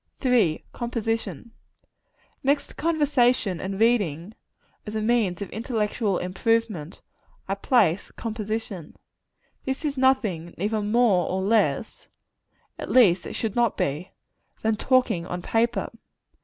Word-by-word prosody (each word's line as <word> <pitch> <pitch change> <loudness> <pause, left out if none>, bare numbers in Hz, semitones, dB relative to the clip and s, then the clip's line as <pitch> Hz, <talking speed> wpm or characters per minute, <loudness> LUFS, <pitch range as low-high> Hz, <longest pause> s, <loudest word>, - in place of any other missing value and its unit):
III. 225 -11 +3
Composition. 225 - -3 0.9
Next 280 +2 +2
to - - -13
conversation 260 - +1
and 195 +1 -4
reading, 205 -6 +1 0.5
as 210 - -5
a 215 - 0
means 215 -5 +1
of - - -9
intellectual 220 -3 -1
improvement, 190 -3 -1 0.4
I 195 - 0
place 200 -4 +2
composition. 215 -6 -5 0.7
This 265 +4 -3
is 285 -2 -2
nothing, 215 -11 +1
either 210 +4 -1
more 210 -3 +3
or 190 0 -1
less 220 +3 0 0.7
at - - -6
least 190 -9 +5
it - - -6
should 220 -3 -3
not 240 -3 +2
be 150 +7 -2 0.5
than 220 0 +2
talking 230 -8 +1
on 180 -1 -5
paper. 230 +1 0
220 Hz, 120 wpm, -25 LUFS, 185-240 Hz, 0.9 s, least